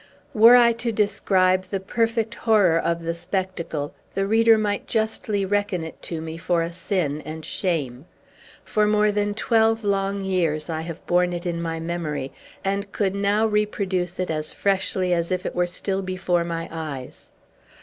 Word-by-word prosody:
Were 230 Hz, +1 st, +8 dB
I 240 Hz, -1 st, +6 dB
to 235 Hz, -1 st, 0 dB
describe 190 Hz, -3 st, +2 dB
the 195 Hz, +1 st, -3 dB
perfect 225 Hz, +3 st, -1 dB
horror 205 Hz, -8 st, +3 dB
of 170 Hz, 0 st, -1 dB
the 165 Hz, 0 st, -1 dB
spectacle, 170 Hz, -4 st, -3 dB, 0.2 s
the 195 Hz, 0 st, +1 dB
reader 225 Hz, +2 st, +5 dB
might 205 Hz, -2 st, -1 dB
justly 220 Hz, -2 st, -1 dB
reckon 205 Hz, -3 st, 0 dB
it 160 Hz, -, -9 dB
to 165 Hz, -2 st, -5 dB
me 160 Hz, 0 st, -6 dB
for 170 Hz, 0 st, +1 dB
a 170 Hz, +1 st, -5 dB
sin 170 Hz, -4 st, -1 dB
and 155 Hz, 0 st, -7 dB
shame. 150 Hz, -8 st, -2 dB, 0.6 s
For 210 Hz, -1 st, +1 dB
more 210 Hz, 0 st, +3 dB
than 205 Hz, 0 st, -1 dB
twelve 225 Hz, 0 st, +2 dB
long 200 Hz, 0 st, 0 dB
years 170 Hz, -4 st, 0 dB
I 160 Hz, 0 st, -2 dB
have 165 Hz, 0 st, -8 dB
borne 180 Hz, 0 st, +2 dB
it 175 Hz, +1 st, -5 dB
in 170 Hz, -1 st, -2 dB
my 165 Hz, -1 st, -3 dB
memory, 160 Hz, -5 st, -3 dB, 0.3 s
and 200 Hz, +1 st, -1 dB
could 195 Hz, -3 st, 0 dB
now 200 Hz, +2 st, +2 dB
reproduce 200 Hz, -4 st, -1 dB
it 185 Hz, -2 st, -1 dB
as 155 Hz, -1 st, -2 dB
freshly 190 Hz, -2 st, 0 dB
as 170 Hz, +1 st, 0 dB
if 185 Hz, 0 st, -1 dB
it -, -, -3 dB
were 175 Hz, 0 st, +1 dB
still 190 Hz, +2 st, -2 dB
before 185 Hz, -2 st, 0 dB
my 165 Hz, 0 st, -4 dB
eyes. 150 Hz, -6 st, -7 dB
185 Hz, 170 wpm, -23 LUFS, 170-205 Hz, 0.6 s, Were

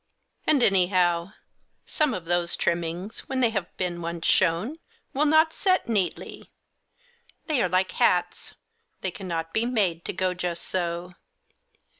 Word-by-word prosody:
And, 285 Hz, -5 st, +4 dB
anyhow, 180 Hz, -2 st, +3 dB, 0.5 s
some 300 Hz, -6 st, 0 dB
of 180 Hz, -, -6 dB
those 175 Hz, 0 st, +1 dB
trimmings, 170 Hz, +4 st, -2 dB
when 265 Hz, -1 st, -1 dB
they 240 Hz, -3 st, +3 dB
have 190 Hz, -5 st, -4 dB
been 175 Hz, -2 st, -2 dB
once 170 Hz, 0 st, -4 dB
shown, 190 Hz, -, +2 dB, 0.3 s
will 295 Hz, +3 st, +2 dB
not 315 Hz, +1 st, +4 dB
set 370 Hz, -2 st, +1 dB
neatly; 200 Hz, -7 st, -2 dB, 1.0 s
they 300 Hz, -6 st, +1 dB
are 185 Hz, -, +1 dB
like 185 Hz, +1 st, +1 dB
hats, -, -, 0 dB, 0.5 s
they 190 Hz, -, -1 dB
cannot 165 Hz, -4 st, -5 dB
be 220 Hz, -, +1 dB
made 190 Hz, -9 st, 0 dB
to -, -, -2 dB
go 185 Hz, 0 st, 0 dB
just 175 Hz, -1 st, -3 dB
so. 175 Hz, 0 st, -3 dB
185 Hz, 140 wpm, -26 LUFS, 170-230 Hz, 1.0 s, And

